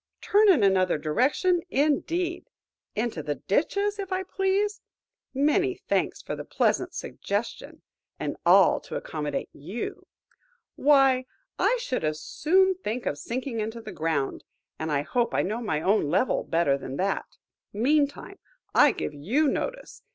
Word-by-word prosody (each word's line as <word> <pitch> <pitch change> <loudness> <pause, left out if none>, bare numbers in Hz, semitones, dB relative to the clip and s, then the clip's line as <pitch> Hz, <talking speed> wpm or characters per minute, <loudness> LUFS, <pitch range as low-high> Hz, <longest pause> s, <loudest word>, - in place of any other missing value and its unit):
Turn 420 0 +4
in 305 - +5
another 185 -3 +3
direction, 265 - +1
indeed!–into 300 - -2
the 145 0 -3
ditches 400 - 0
if 390 -1 -5
I 375 0 0
please–many 385 - -1
thanks - - 0
for - - -4
the - - -6
pleasant - - 0
suggestion–and 205 +3 -5
all - - +6
to - - -9
accommodate 150 -3 -4
you! 185 +11 -6 0.7
Why, 270 -3 +4 0.3
I - - +3
should 260 - -3
as 155 0 -1
soon 375 - +2
think 235 +4 -3
of 145 - -2
sinking 245 - -4
into 220 +2 -3
the 225 -2 -8
ground, 155 -4 -2 0.4
and 160 0 -3
I 145 -1 +1
hope 240 +8 0
I - - +2
know 215 +5 -2
my 155 -10 -1
own 195 -6 +2
level 185 - +1
better 155 -5 +1
than 135 0 -6
that! 195 +1 -2 0.3
Meantime, 285 - 0 0.3
I - - +6
give - - -4
you 225 - +1
notice. - - -3
245 Hz, 135 wpm, -26 LUFS, -, 0.7 s, all